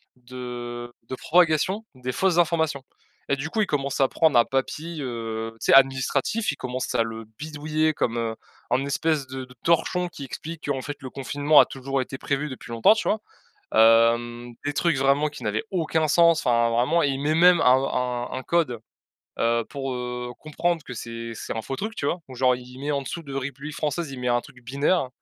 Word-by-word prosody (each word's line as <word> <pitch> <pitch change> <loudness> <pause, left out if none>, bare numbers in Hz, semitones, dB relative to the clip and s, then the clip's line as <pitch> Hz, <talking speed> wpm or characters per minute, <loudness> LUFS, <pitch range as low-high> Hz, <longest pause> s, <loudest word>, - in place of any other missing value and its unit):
de 120 -1 -7 0.2
de 130 - -3
propagation 175 - +2
des 125 -1 -4
fausses 185 +4 +1
informations 160 -5 +1 0.5
et 140 - +3
du 145 +4 -4
coup, 220 - -2
il 205 - +1
commence 140 -2 -1
à 135 - +5
prendre 155 -3 +3
un 120 - +5
papier, 155 +4 -3
heu, 115 -3 -4
tu - - -5
sais, - - +5
administratif, 135 - +3
il - - -6
commence 130 -1 -4
à 115 - +4
le 115 0 -6
bidouiller 155 +1 -1
comme, 120 -5 -1
heu, 115 -1 -2 0.4
un 130 +3 +2
espèce 150 0 0
de 130 0 -6
de 125 - -16
torchon 180 +2 +2
qui 150 -5 -9
explique 160 +5 -7
qu'en 135 -2 -1
fait, 145 +2 -5
le 130 - -6
confinement 145 +3 +3
a - - +8
toujours 135 0 -3
été 130 +1 -6
prévu 140 +2 -2
depuis 130 -2 -9
longtemps, 115 - +5
tu 215 - -2
vois? 215 - +1 0.5
Hem, 120 +1 +4
des 145 - -1
trucs 165 -3 +1
vraiment 140 +3 +3
qui 150 - -10
n'avaient - - -1
aucun 160 -3 +1
sens, 170 0 +5
enfin 115 -1 +3
vraiment, 125 +9 +2
il 140 -3 +1
met 150 +2 +1
même 175 0 +6
un - - +2
un 125 -1 +1
un 130 - -4
code, 155 -9 0 0.6
heu, 115 0 +2
pour 135 -1 -4
heu, 125 0 -4
comprendre 165 +1 -1
que 125 - -8
c'est 115 0 -6
c'est 110 - -6
un 110 - -4
faux 135 - -4
truc, 220 +6 -4
tu 140 - -3
vois? 170 +5 0
Genre 130 0 +2
il 125 - -9
il 125 +1 -12
met 145 +2 -2
en 140 -1 0
dessous 165 +5 -6
de 140 - -8
République 140 +2 -5
Française, 155 0 -2
il 130 - -7
met 125 - -3
un 120 0 +2
truc 135 -1 -16
binaire, 140 +5 +1
135 Hz, 210 wpm, -25 LUFS, 125-155 Hz, 0.6 s, a